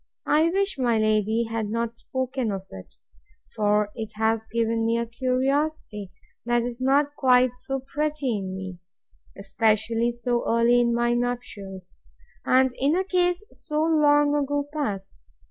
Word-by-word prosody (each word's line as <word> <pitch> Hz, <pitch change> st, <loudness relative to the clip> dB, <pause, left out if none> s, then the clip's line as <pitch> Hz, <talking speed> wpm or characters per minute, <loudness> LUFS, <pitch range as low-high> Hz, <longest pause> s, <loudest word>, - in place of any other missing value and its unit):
I 315 Hz, +2 st, +3 dB
wish 390 Hz, -3 st, -1 dB
my 240 Hz, -3 st, +2 dB
lady 215 Hz, +1 st, +2 dB
had 225 Hz, -2 st, -3 dB
not 230 Hz, +1 st, -2 dB
spoken 260 Hz, -1 st, -3 dB
of 195 Hz, -1 st, -5 dB
it: 95 Hz, -1 st, -11 dB, 0.6 s
for 210 Hz, 0 st, +2 dB
it 220 Hz, -2 st, -6 dB
has 220 Hz, 0 st, 0 dB
given 230 Hz, 0 st, 0 dB
me 230 Hz, +1 st, +1 dB
a 235 Hz, -, -1 dB
curiosity 255 Hz, -3 st, -1 dB, 0.3 s
that 240 Hz, 0 st, +1 dB
is 245 Hz, +1 st, -5 dB
not 285 Hz, +2 st, +2 dB
quite 255 Hz, -3 st, +4 dB
so 270 Hz, +1 st, -4 dB
pretty 285 Hz, -4 st, -2 dB
in 190 Hz, -1 st, -5 dB
me; 190 Hz, -2 st, -7 dB, 0.6 s
especially 225 Hz, +3 st, +1 dB
so 240 Hz, 0 st, -1 dB
early 235 Hz, +1 st, +4 dB
in 235 Hz, -1 st, +2 dB
my 240 Hz, 0 st, +2 dB
nuptials, 220 Hz, -6 st, -4 dB, 0.5 s
and 260 Hz, 0 st, +4 dB
in 285 Hz, +4 st, +2 dB
a 375 Hz, -, +1 dB
case 360 Hz, 0 st, 0 dB
so 300 Hz, +1 st, -2 dB
long 295 Hz, -2 st, +4 dB
ago 290 Hz, 0 st, 0 dB
past. 205 Hz, -11 st, -4 dB
240 Hz, 145 wpm, -25 LUFS, 220-280 Hz, 0.6 s, quite